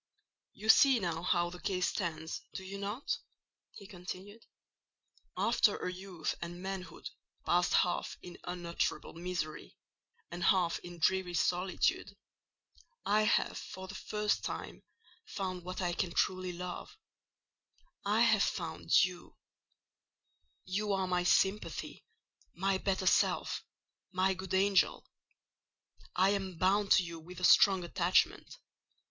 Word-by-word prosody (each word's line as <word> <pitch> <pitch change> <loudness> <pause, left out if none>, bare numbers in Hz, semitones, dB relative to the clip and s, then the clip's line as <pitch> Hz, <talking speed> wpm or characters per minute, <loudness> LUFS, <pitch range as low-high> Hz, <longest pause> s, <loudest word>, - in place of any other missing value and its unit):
"You 215 - -8
see 265 +2 +7
now 170 -4 -2
how 175 -1 +1
the 180 - -9
case 180 -1 0
stands—do 170 +1 -5
you 195 +1 -7
not?" 205 +7 -3 0.5
he 200 - -11
continued. 190 +3 -9 0.9
"After - - +3
a 180 - -3
youth 180 -3 -4
and 175 +1 -6
manhood 190 0 -6 0.4
passed 175 -1 +3
half 175 - +1
in 175 - -10
unutterable 175 -1 -3
misery 165 - -5 0.5
and 175 +2 -3
half 180 -3 +3
in 175 0 -10
dreary 180 +1 +1
solitude, 185 +3 0 0.9
I 215 +1 +3
have - - +1
for 190 0 -8
the 190 - -8
first 210 +2 -1
time - - -5 0.5
found 185 - -4
what 185 +1 -4
I 175 -1 0
can 175 0 -2
truly 185 -1 +1
love—I 180 - -7
have - - +5
found 215 - +2
you. 180 -1 -9 1.3
You 200 +2 -1
are 190 -1 0
my 180 -1 +1
sympathy—my 190 0 -1
better 190 -1 -1
self—my 185 +1 0
good 190 0 -4
angel. 195 0 +3 1.1
I 190 +2 +4
am 190 -3 -2
bound 200 +3 +2
to 185 - +5
you 170 -1 -7
with 175 +2 -11
a - - -8
strong 190 0 +6
attachment. 185 - +1
185 Hz, 120 wpm, -32 LUFS, 175-195 Hz, 1.3 s, see